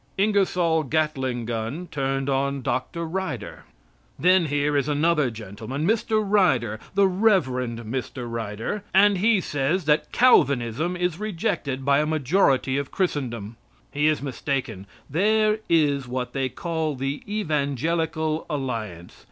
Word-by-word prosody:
INGERSOLL 185 -5 +2
GATLING 135 -5 -1
GUN 115 +9 -3
TURNED 135 -1 -1
ON 140 0 0
DR. 170 +8 -2
RYDER 160 - -5 0.5
Then 180 -1 +4
here 145 0 0
is 140 +1 +1
another 150 -1 +2
gentleman, 115 +6 -6
Mr. 220 0 +1
Ryder, 130 - +2 0.2
the 200 -1 +5
Rev. 195 +1 +3
Mr. 125 0 -4
Ryder, 115 - -4
and 200 -1 +5
he 215 +1 +4
says 150 +2 -1
that 150 0 +2
Calvinism 145 - +3
is 180 -1 -1
rejected 170 - -2
by 140 0 +4
a 150 - +1
majority 140 -3 +2
of 140 - -4
Christendom. 120 - -3 0.3
He 145 +1 +1
is 155 -2 +1
mistaken. 130 -6 -3 0.2
There 215 +7 +2
is 145 -5 +2
what 125 0 -4
they 135 -1 -1
call 160 +1 -3
the 135 +2 -3
Evangelical 155 - -1
Alliance. 115 - -4
145 Hz, 125 wpm, -24 LUFS, 130-175 Hz, 0.5 s, the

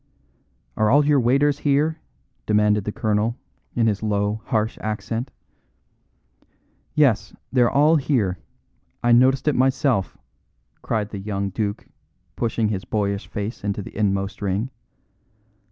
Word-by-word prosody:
"Are 110 0 +3
all 145 +4 +5
your 145 -1 +4
waiters 140 +4 +2
here?" 150 +3 +1 0.5
demanded 105 -1 +2
the 105 - -2
colonel, 110 +2 0 0.4
in 115 - +2
his 105 -3 +1
low, 105 0 -1
harsh 110 -1 -1
accent. 115 +3 -3 1.7
"Yes; 135 -9 +2 0.2
they're 120 -2 +4
all 150 +4 +4
here. 115 - 0 0.6
I 120 - +3
noticed 130 +4 +4
it 150 - +4
myself," 130 -5 +1 0.6
cried 105 -2 -2
the 100 - -6
young 100 -1 -3
duke, 105 +1 -3 0.5
pushing 115 -2 0
his 100 -3 -2
boyish 100 0 -2
face 105 +1 -5
into 100 0 -2
the - - -11
inmost 100 -1 -1
ring. 100 +6 -1
110 Hz, 125 wpm, -23 LUFS, 105-130 Hz, 1.7 s, all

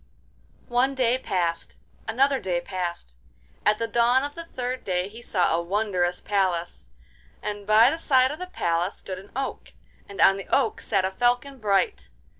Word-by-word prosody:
One 260 +3 +2
day 255 -1 +2
passed, 170 -7 -2 0.3
another 270 +4 +2
day 180 -2 -1
passed; 175 - -5 0.5
at 210 - +4
the 230 - -2
dawn 240 +3 +3
of 285 0 -4
the 335 +1 -8
third 255 -4 -4
day 180 -1 -1
he 220 +4 -11
saw 180 -7 +1
a 170 - 0
wondrous 180 -1 -1
palace, 180 - -1 0.5
and 205 -1 -5
by 220 +4 +6
the 320 - -3
side 260 -4 +3
of 305 - -7
the 365 - -5
palace 175 - -1
stood 185 -1 -7
an 195 +2 -14
oak, 270 0 -4 0.4
and 200 - -10
on 195 - +6
the 195 - -8
oak 260 -5 +1
sat 195 -4 +1
a 190 - -1
falcon 245 +5 0
bright. 215 - 0
210 Hz, 175 wpm, -25 LUFS, 185-255 Hz, 0.5 s, by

